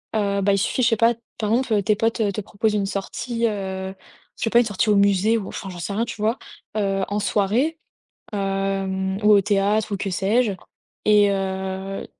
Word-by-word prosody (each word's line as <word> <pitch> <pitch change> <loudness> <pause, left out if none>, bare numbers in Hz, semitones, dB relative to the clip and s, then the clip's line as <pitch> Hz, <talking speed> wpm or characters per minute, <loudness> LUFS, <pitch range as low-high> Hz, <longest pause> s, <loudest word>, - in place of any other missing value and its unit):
heu, 200 -2 +1
bah, 200 +1 +3
il - - +2
suffit, 255 - 0
je 235 - +5
sais 225 - +1
pas 230 +1 +4 0.2
par 215 - -1
exemple, 230 -4 +2
tes 210 +2 +2
potes 225 -1 0
te 210 - -3
proposent 210 +2 -1
une 200 -1 +1
sortie, 230 +4 -3
heu, 190 -2 -4 0.4
je - - -5
sais 225 - +1
pas, 235 - +6
une 240 - +3
sortie 210 +1 0
au 205 - +5
musée 200 +2 +3
ou 200 -4 -5
enfin, 195 - -6
j'en 175 -1 -8
sais 185 +4 -4
rien 225 +3 0
tu 225 - -7
vois? 220 +4 +1 0.4
Heu, 195 -2 0
en 205 +1 -1
soirée, 220 - +1 0.5
hem, 195 -1 -1
ou 210 - +6
au 200 - +7
théâtre 205 +1 +1
ou - - 0
que 195 0 -3
sais-je? 205 +5 +1 0.5
Et 210 -1 +5
heu, 190 0 -3
200 Hz, 205 wpm, -22 LUFS, 195-220 Hz, 0.5 s, au